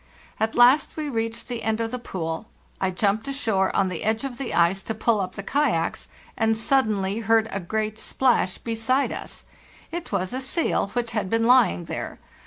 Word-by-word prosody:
At 220 +1 0
last 250 +7 +5
we 305 -1 -2
reached 230 -2 -3
the 240 -2 -4
end 220 0 0
of 225 0 -2
the 250 - -3
pool; 165 -3 -4 0.4
I 190 - +2
jumped 200 +6 0
ashore 225 -9 +1
on 195 - +3
the 180 -3 -4
edge 220 +2 0
of 270 -2 -5
the 270 - -3
ice, 175 +3 +3
to 220 - -4
pull 220 -1 +2
up 185 - -4
the 200 - -6
kayaks, 250 - 0 0.3
and 225 0 +2
suddenly 215 -5 +1
heard 225 0 +3
a 195 - -2
great 215 +4 -2
splash 240 -9 +1
beside 230 +4 0
us. - - -7 0.5
It 345 0 -5
was 185 +5 -1
a 260 - -2
seal 275 - 0
which 240 -1 -1
had 210 -4 -2
been 225 +2 +2
lying 245 -6 +4
there. 165 - -5
225 Hz, 195 wpm, -24 LUFS, 195-245 Hz, 0.5 s, last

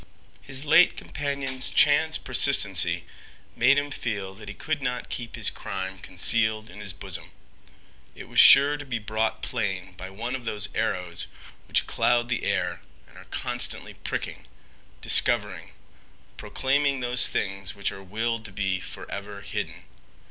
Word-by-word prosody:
His 135 +1 -4
late 165 +4 +5
companion's 140 -3 -2
chance 155 +2 +4
persistency 95 -10 +3 0.5
made 130 +4 +4
him 145 0 -1
feel 100 -7 -4
that 105 +2 -13
he 105 - -8
could 155 -2 -3
not 125 -1 -3
keep 120 -1 -4
his - - +1
crime 95 0 -6
concealed 110 +3 +1
in 95 - -12
his 105 -2 -4
bosom. - - -6 0.9
It - - -10
was - - 0
sure 145 +1 +8
to 145 - -8
be 130 -4 -3
brought 110 +1 -2
plain 95 -6 -3
by 95 +1 -8
one 115 +6 -5
of 130 -2 -4
those 105 -3 -2
arrows 90 -2 -2 0.4
which - - +1
cloud 120 0 +1
the 120 - -2
air - - -1 0.3
and - - -21
are - - -13
constantly - - -2
pricking, - - -6 0.5
discovering, - - +3 0.6
proclaiming 140 0 0
those 125 0 +5
things 95 0 -3
which 100 -1 -2
are 95 - -10
willed 110 +4 -3
to 105 - -7
be 95 -1 -1
forever 100 +2 -8
hidden. - - -5
110 Hz, 150 wpm, -25 LUFS, 95-130 Hz, 0.9 s, sure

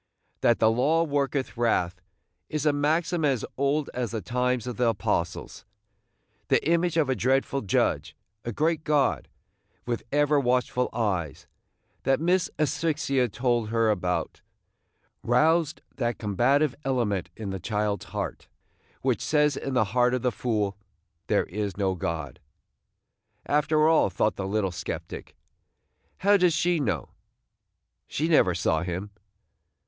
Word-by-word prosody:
That 120 - +3
"the 110 0 +4
law 150 +8 +2
worketh 140 -3 -1
wrath" 95 -6 0 0.5
is 155 -1 -2
a 150 - +4
maxim 160 +4 0
as 135 -6 +1
old 140 +2 0
as 125 -2 -2
the 115 - -3
times 125 +3 -1
of 125 -4 -5
the 125 -1 +3
Apostles. 115 - -2 0.8
The - - +2
image 170 0 +2
of 155 -4 +3
a 130 - +2
dreadful 135 +4 +1
Judge 75 -6 0
– 105 +3 -52
a 120 - -3
great 160 +6 0
God, 150 -4 +1 0.6
with 120 -1 -2
ever 145 0 +3
watchful 125 -1 +1
eyes, 90 - -2 0.6
that 135 0 +2
Miss 180 +2 +2
Asphyxia 145 -4 0
told 120 -1 0
her 115 -1 +2
about 90 -3 -2 0.4
– - - -45
roused 155 +6 +2
that 120 -3 -1
combative 125 +7 +2
element 115 -8 -1
in 105 -3 -5
the 95 - -4
child's 105 +1 -2
heart - - -5 0.6
which - - +1
says 150 -1 +2
in 135 - -4
the 125 - +4
heart 125 0 +3
of 125 - -3
the 125 - +2
fool, 105 -5 -1 0.5
"There - - +2
is 100 0 -4
no 95 -2 +1
God." 80 -6 -4 1.1
"After 155 +1 +2
all," 160 -9 +4
thought 95 +4 0
the 95 - -4
little 100 -1 0
sceptic, 85 - -6 0.8
"how 205 +1 +4
does 180 -3 +3
she 170 +1 +1
know? 105 - -2 1.0
She 155 - -1
never 120 - +4
saw 80 -2 +1
him." 90 +3 -4
125 Hz, 145 wpm, -26 LUFS, 105-150 Hz, 1.1 s, the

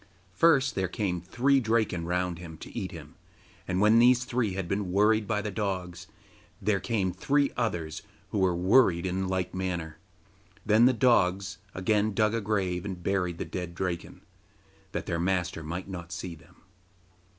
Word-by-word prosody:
First 140 -5 +4
there 95 -1 -1
came 90 -2 -2
three 130 +10 +2
Draken 110 -7 0
round 90 -1 -1
about 80 -2 -10
to - - -10
eat - - -3
him, - - -10 0.5
and 90 0 0
when 105 +3 +5
these 125 +1 +5
three 120 -6 -1
had 95 -2 -3
been 100 0 -2
worried 105 +2 +3
by 105 -2 0
the 105 - -3
dogs, 90 -4 -3 0.5
there 105 -2 +1
came 95 -4 -1
three 145 -1 +1
others 85 -10 -2 0.3
who 105 - -1
were 95 -2 +2
worried 90 -1 +4
in 95 +1 -1
like 95 -1 -2
manner. 85 -4 -4 0.7
Then 110 +2 +5
the 130 - +5
dogs 95 -6 +2 0.2
again 105 +2 +1
dug 110 -1 +2
a 115 - 0
grave 95 -4 -1
and 95 -3 -6
buried 90 -3 0
the - - -4
dead 90 -2 -5
Draken, 90 -2 -4 0.7
that - - -4
their 85 - -2
master 90 -1 -1
might 85 +4 -5
not 85 -3 -7
see 95 -3 -5
them. 80 - -17
95 Hz, 170 wpm, -28 LUFS, 90-110 Hz, 0.7 s, when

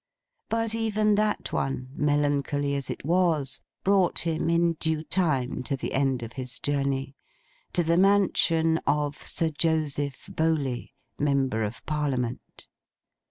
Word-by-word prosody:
But, 225 0 0
even 215 -2 +2
that 210 0 0
one, 130 -1 -2
melancholy 145 -1 +1
as 140 -2 -3
it - - -5
was, 160 -6 +1 0.2
brought 190 -3 +2
him, 160 0 0
in 170 0 +3
due 160 -1 0
time, 150 -9 0
to 140 - -1
the - - -4
end 135 -3 +1
of 115 +1 -7
his 130 -2 -4
journey. 140 -1 -1 0.6
To 175 - +2
the 165 +1 +2
mansion 170 -4 +3
of 145 0 +1
Sir 165 - -1
Joseph 150 -3 -1
Bowley, 145 -6 -1 0.2
Member 135 -5 +1
of 110 +2 -4
Parliament. 135 -6 -3
150 Hz, 130 wpm, -27 LUFS, 135-170 Hz, 0.6 s, in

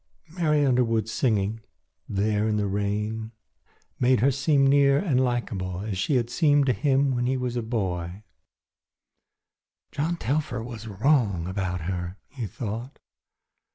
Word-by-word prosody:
Mary 155 -4 +1
Underwood's 115 -4 +1
singing 110 -3 0 0.5
there 105 +2 +1
in 105 -1 +1
the 105 - 0
rain 105 +3 -2 0.7
made 125 -1 +4
her 135 +3 +4
seem 140 +1 +2
near 140 0 +5
and 140 -6 +2
likeable 100 -7 -2
as 105 -1 -3
she 105 +9 0
had 120 -2 +1
seemed 145 -2 +3
to 130 - +3
him 135 +4 +2
when 125 0 0
he 130 +1 +1
was 125 -1 -3
a 120 - 0
barefoot 110 - -9
boy. 95 -4 -3 1.7
"John 160 +4 -1
Telfer 130 -3 -2
was 115 -2 -8
wrong 105 - +1
about 95 -2 -2
her," 90 +2 -4
he 125 -6 -5
thought. 115 +6 -6
115 Hz, 145 wpm, -26 LUFS, 100-135 Hz, 1.7 s, near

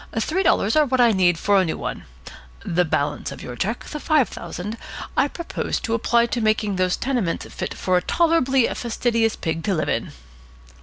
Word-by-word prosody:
Three 325 - 0
dollars 215 - +2
are 305 -1 +4
what 260 0 0
I 240 -2 +6
need 180 -4 +3
for 200 +2 +3
a - - +2
new 165 - -2
one. - - -5 0.6
The 180 +2 +2
balance 145 -1 -1
of - - -9
your 125 - -7
cheque, 215 - -2
the 300 - -6
five 300 -6 +3
thousand, 210 +5 -6 0.4
I - - +3
propose 340 +3 -3
to 225 - -2
apply 235 +1 +3
to 235 0 -2
making 215 -2 +1
those 185 -1 +1
tenements 240 -10 -1
fit - - -4
for 185 -1 +1
a - - +1
tolerably 270 - +2
fastidious 230 -1 0
pig 160 -1 -3
to 195 - +1
live 155 - -1
in." 115 - -1
220 Hz, 195 wpm, -22 LUFS, 180-250 Hz, 0.6 s, I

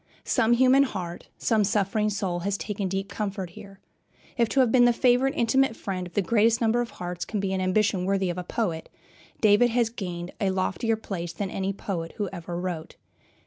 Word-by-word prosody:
Some 225 +1 +3
human 260 +3 +5
heart, 185 -10 -3
some 220 -3 +2
suffering 210 +1 +1
soul, 195 -4 -2
has 200 +3 -1
taken 205 -2 -3
deep 195 +1 -2
comfort 195 -4 -4
here. 195 +2 -13 0.6
If 235 -2 +2
to 275 - +1
have 245 -3 +3
been 245 0 +6
the 240 - +5
favorite, 255 +3 +3
intimate 240 +1 +2
friend 185 -4 -4
of 175 - -16
the 205 - +2
greatest 225 +3 +3
number 230 +1 +2
of 240 - -3
hearts 175 0 -4
be 200 -3 -2
an 190 - -1
ambition 185 0 +1
worthy 195 -1 +1
of 180 - -5
a - - -4
poet, 175 -5 -3 0.5
David 215 +3 +5
has 235 -1 +1
gained 180 -5 -5
a 195 - +2
loftier 195 +4 0
place 175 -6 -5
than 190 +2 -4
any 195 0 -1
poet 175 -4 -5
who 205 -3 -2
ever 175 -1 -5
wrote. 175 -3 -5
200 Hz, 195 wpm, -26 LUFS, 185-225 Hz, 0.6 s, been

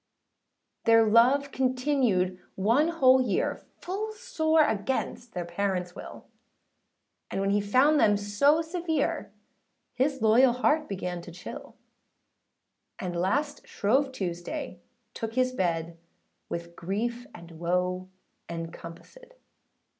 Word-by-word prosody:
Their 225 0 +6
love 250 +6 +4
continued 255 -8 +1 0.2
one 230 +11 +3
whole 260 -6 +5
year, 235 -6 -1 0.2
Full 420 +4 -4
sore 320 -9 +2
against 240 +2 -2
their 175 -1 -3
parentsâ 180 0 -2
will; - - -10 1.0
And - - -3
when 195 0 +1
he 205 0 +2
found 260 +9 +4
them 205 -5 +4
so 245 +11 +2
severe, 330 -1 -2 0.6
His 270 +2 0
loyal 235 +3 +5
heart 300 +5 +1
began 180 -3 -4
to 170 - -10
chill: 180 +2 -9 1.2
And 180 -2 -4
last 285 - -1
Shrove 265 +7 +1
Tuesday, 175 -5 -5 0.3
took 225 0 -5
his 255 0 +2
bed, 170 -6 -2 0.5
With 170 0 -6
grief 235 +8 -3
and 170 -1 -12
woe 180 +2 -1 0.4
encompassèd. 170 - -9
225 Hz, 110 wpm, -27 LUFS, 180-280 Hz, 1.2 s, Their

